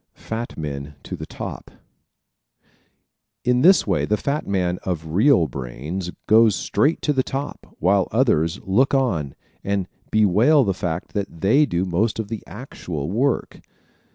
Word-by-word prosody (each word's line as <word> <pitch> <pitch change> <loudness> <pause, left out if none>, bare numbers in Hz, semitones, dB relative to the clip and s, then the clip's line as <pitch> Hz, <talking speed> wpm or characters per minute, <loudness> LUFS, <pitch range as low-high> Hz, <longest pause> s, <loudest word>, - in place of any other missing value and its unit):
Fat 115 +2 -6
Men 75 -1 -5
to - - -6
the - - -8
Top - - -7 0.9
¶ - - -36 0.7
In 125 0 +3
this 185 +6 +6
way - - 0
the 105 - +1
fat 140 +6 -2
man 90 -2 0
of 80 -4 -4
real 110 - +4
brains 70 +7 -5 0.2
goes 110 -1 +5
straight 150 +4 0
to 150 - +2
the 135 - +2
top 135 +2 -6
while 95 +1 +2
others 105 - +2
look 125 +9 +2
on 85 - 0 0.3
and 100 -2 -1 0.2
bewail 110 - +4
the 100 -4 0
fact 85 -1 -4
that 100 -5 -4
they 135 +10 +4
do 90 -3 -1
most 95 +5 0
of 110 -2 -4
the 115 -2 -4
actual 90 - -6
work. 130 +6 -1
100 Hz, 155 wpm, -22 LUFS, 85-125 Hz, 0.9 s, this